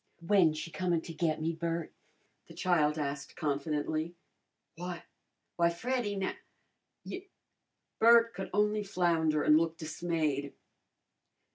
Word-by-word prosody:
"When 180 Hz, -4 st, +5 dB
she 155 Hz, +2 st, -6 dB
comin' 175 Hz, -2 st, 0 dB
to 165 Hz, -, -8 dB
get 160 Hz, -1 st, 0 dB
me, 160 Hz, +1 st, -1 dB
Bert?" 165 Hz, 0 st, -3 dB, 0.5 s
the -, -, -13 dB
child 160 Hz, -5 st, +2 dB
asked 140 Hz, -1 st, -4 dB
confidently. 155 Hz, +2 st, -2 dB, 0.6 s
"Why 175 Hz, 0 st, -6 dB, 0.5 s
why, 170 Hz, -1 st, +4 dB
Freddy 225 Hz, +4 st, -2 dB
now 190 Hz, -1 st, -1 dB, 0.7 s
you 380 Hz, +1 st, -7 dB, 0.4 s
" -, -, -53 dB
Bert 230 Hz, 0 st, +6 dB
could 190 Hz, +1 st, -5 dB
only 210 Hz, 0 st, +2 dB
flounder 165 Hz, -6 st, +1 dB
and 150 Hz, -, +6 dB
look 165 Hz, 0 st, 0 dB
dismayed. 155 Hz, -4 st, -2 dB
165 Hz, 125 wpm, -31 LUFS, 155-185 Hz, 0.7 s, Bert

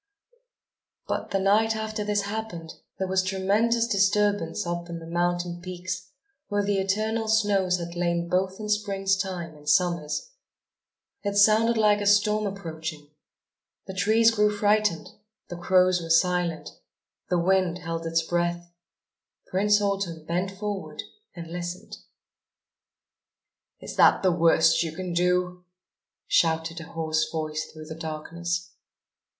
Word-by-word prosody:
But, -, -, -3 dB
the 195 Hz, -, 0 dB
night 215 Hz, +3 st, +3 dB
after 220 Hz, -1 st, -3 dB
this 205 Hz, -1 st, 0 dB
happened, 200 Hz, -6 st, -5 dB, 0.2 s
there 190 Hz, -, -2 dB
was 190 Hz, 0 st, +2 dB
tremendous 205 Hz, +5 st, +1 dB
disturbance 205 Hz, -4 st, +1 dB
up 175 Hz, 0 st, -4 dB
on 170 Hz, -, -5 dB
the 165 Hz, -, -9 dB
mountain 175 Hz, +1 st, -1 dB
peaks, 185 Hz, +2 st, -6 dB, 0.4 s
where 205 Hz, -1 st, 0 dB
the 200 Hz, -1 st, 0 dB
eternal 215 Hz, +3 st, -1 dB
snows 200 Hz, -4 st, +2 dB
had 170 Hz, -1 st, -6 dB
lain 170 Hz, 0 st, 0 dB
both 185 Hz, +2 st, -1 dB
in 215 Hz, -, -5 dB
Spring's 200 Hz, -2 st, +1 dB
time 180 Hz, -4 st, -4 dB
and 150 Hz, 0 st, -7 dB
Summer's. 175 Hz, -, +1 dB, 0.9 s
It 200 Hz, -1 st, -2 dB
sounded 220 Hz, +3 st, +5 dB
like 210 Hz, -1 st, +3 dB
a 205 Hz, -, -1 dB
storm 210 Hz, +1 st, +3 dB
approaching. 160 Hz, -6 st, -6 dB, 0.7 s
The 190 Hz, -, -7 dB
trees 220 Hz, +4 st, +4 dB
grew 210 Hz, -2 st, +3 dB
frightened, 210 Hz, -3 st, +1 dB, 0.4 s
the 175 Hz, -, -5 dB
crows 180 Hz, 0 st, +3 dB
were 165 Hz, -, -7 dB
silent, 175 Hz, 0 st, +1 dB, 0.6 s
the 180 Hz, -, +2 dB
wind 180 Hz, 0 st, +2 dB
held 165 Hz, -2 st, -5 dB
its 165 Hz, 0 st, +1 dB
breath. 175 Hz, 0 st, -2 dB, 0.8 s
Prince 205 Hz, +2 st, +3 dB
Autumn 195 Hz, -6 st, -2 dB
bent 180 Hz, +3 st, -1 dB
forward 200 Hz, 0 st, -5 dB, 0.3 s
and 170 Hz, -1 st, -7 dB
listened: 175 Hz, +1 st, -6 dB, 1.8 s
"Is -, -, -8 dB
that -, -, +5 dB
the 185 Hz, -, +4 dB
worst 165 Hz, -1 st, +4 dB
you 165 Hz, -2 st, -2 dB
can 180 Hz, 0 st, -4 dB
do?" 180 Hz, +1 st, 0 dB, 0.6 s
shouted 165 Hz, 0 st, +1 dB
a 165 Hz, -, -8 dB
hoarse 160 Hz, -2 st, -1 dB
voice 155 Hz, -1 st, -3 dB
through 155 Hz, 0 st, -11 dB
the 160 Hz, -, -7 dB
darkness. 170 Hz, +2 st, -4 dB
185 Hz, 135 wpm, -26 LUFS, 170-205 Hz, 1.8 s, sounded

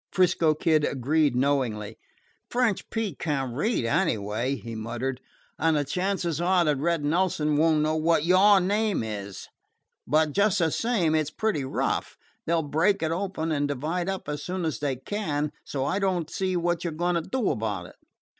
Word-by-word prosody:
'Frisco 170 Hz, -4 st, +3 dB
Kid 155 Hz, -1 st, +2 dB
agreed 145 Hz, +1 st, +1 dB
knowingly. 125 Hz, -6 st, 0 dB, 0.5 s
"French 240 Hz, -5 st, 0 dB
Pete 220 Hz, -, -3 dB
can't 135 Hz, -6 st, -2 dB
read, 210 Hz, -, 0 dB
anyway," 115 Hz, -, 0 dB
he 115 Hz, -1 st, -8 dB
muttered, 120 Hz, +4 st, -4 dB, 0.4 s
"and 160 Hz, -1 st, +3 dB
the 145 Hz, -, 0 dB
chances 180 Hz, -2 st, -1 dB
are 180 Hz, 0 st, +3 dB
that 150 Hz, -3 st, +1 dB
Red 165 Hz, 0 st, 0 dB
Nelson 155 Hz, -2 st, +1 dB
won't 155 Hz, 0 st, +3 dB
know 155 Hz, +1 st, +1 dB
what 160 Hz, 0 st, +2 dB
your 190 Hz, +3 st, +6 dB
name 205 Hz, -, 0 dB
is. 100 Hz, -3 st, -6 dB, 0.6 s
But, 155 Hz, 0 st, +3 dB
just 205 Hz, +5 st, +2 dB
the 165 Hz, -3 st, +2 dB
same, 205 Hz, -9 st, +1 dB
it 155 Hz, -2 st, +1 dB
's -, -, -4 dB
pretty 200 Hz, -3 st, -1 dB
rough. 130 Hz, -, -2 dB, 0.3 s
They 170 Hz, -, +1 dB
'll 165 Hz, -, +1 dB
break 165 Hz, +7 st, +1 dB
it 160 Hz, -, 0 dB
open 170 Hz, -2 st, -2 dB
and 145 Hz, -1 st, +1 dB
divide 160 Hz, +6 st, -2 dB
up 190 Hz, -5 st, -4 dB
as 150 Hz, -1 st, -3 dB
soon 180 Hz, +2 st, -3 dB
as 160 Hz, -, -2 dB
they 140 Hz, -3 st, -1 dB
can, 150 Hz, -, -2 dB
so 135 Hz, -2 st, -3 dB
I 170 Hz, +8 st, 0 dB
don't 185 Hz, -5 st, -1 dB
see 185 Hz, -1 st, -1 dB
what 175 Hz, 0 st, 0 dB
you 175 Hz, -, -1 dB
're -, -, -7 dB
going 175 Hz, +1 st, +1 dB
to 170 Hz, -, +1 dB
do 245 Hz, +6 st, -1 dB
about 105 Hz, -5 st, -3 dB
it." -, -, -13 dB
160 Hz, 185 wpm, -26 LUFS, 140-185 Hz, 0.6 s, your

